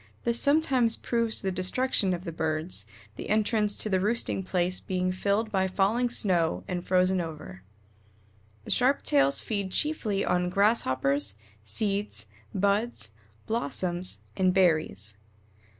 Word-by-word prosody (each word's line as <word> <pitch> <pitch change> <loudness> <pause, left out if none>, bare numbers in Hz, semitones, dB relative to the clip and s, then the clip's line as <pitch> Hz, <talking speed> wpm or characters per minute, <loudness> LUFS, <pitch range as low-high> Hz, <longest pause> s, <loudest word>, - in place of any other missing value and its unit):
This 235 0 +3
sometimes 270 -6 +3
proves 230 -2 0
the 190 - 0
destruction 190 +2 +1
of 175 0 -3
the 170 - -5
birds, 155 - -2 0.3
the - - -7
entrance 215 -1 +1
to - - -1
the 190 -3 +1
roosting 210 0 -1
place 180 -1 0
being 185 -1 -2
filled 200 +4 -1
by 190 -1 +1
falling 210 +6 +1
snow 180 -8 +2
and 180 -1 -3
frozen 185 0 +2
over. 155 - -8 1.0
The - - 0
Sharp 265 +3 +2
tails 140 -1 +4
feed 200 -4 -3
chiefly 220 -8 -1
on 180 0 0
Grasshoppers, 140 - +1 0.3
seeds, 195 - -1 0.3
buds, 200 - 0 0.3
blossoms, 180 - -2
and 185 0 +2
berries. 155 - +1
190 Hz, 130 wpm, -27 LUFS, 170-215 Hz, 1.0 s, tails